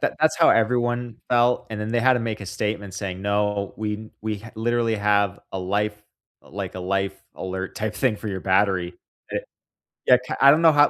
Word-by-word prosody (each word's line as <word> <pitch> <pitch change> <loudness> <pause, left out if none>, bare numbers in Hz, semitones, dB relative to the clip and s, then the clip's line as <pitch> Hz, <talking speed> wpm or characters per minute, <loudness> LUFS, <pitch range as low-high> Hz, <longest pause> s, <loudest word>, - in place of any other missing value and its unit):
that - - 0
that's - - +3
how - - +5
everyone 120 0 +2
felt, 120 0 +3
and 105 - -4
then 105 +1 -3
they 120 - +2
had 130 +1 +5
to - - +1
make 110 -2 -3
a 100 - -7
statement 100 -1 -3
saying, 95 -2 -4
"No, 100 0 0
we 110 0 -4
we 110 -2 -2
ha 115 +2 -11
literally 115 0 +1
have 100 -1 +2
a 95 - -3
life, 105 +3 -1 0.4
like, 95 +3 -6
a 95 - -5
life 95 +1 -1 0.2
alert 95 0 -5
type 110 0 -2
thing 125 -6 +1
for 110 - -6
your 95 -2 -3
battery." 95 -2 +1 0.4
That - - -2 0.6
Yeah, 125 - +8
ca - - -3
I 140 - +9
don't 155 +3 +4
know 165 - +7
how 145 -1 +5
105 Hz, 210 wpm, -24 LUFS, 100-115 Hz, 0.6 s, I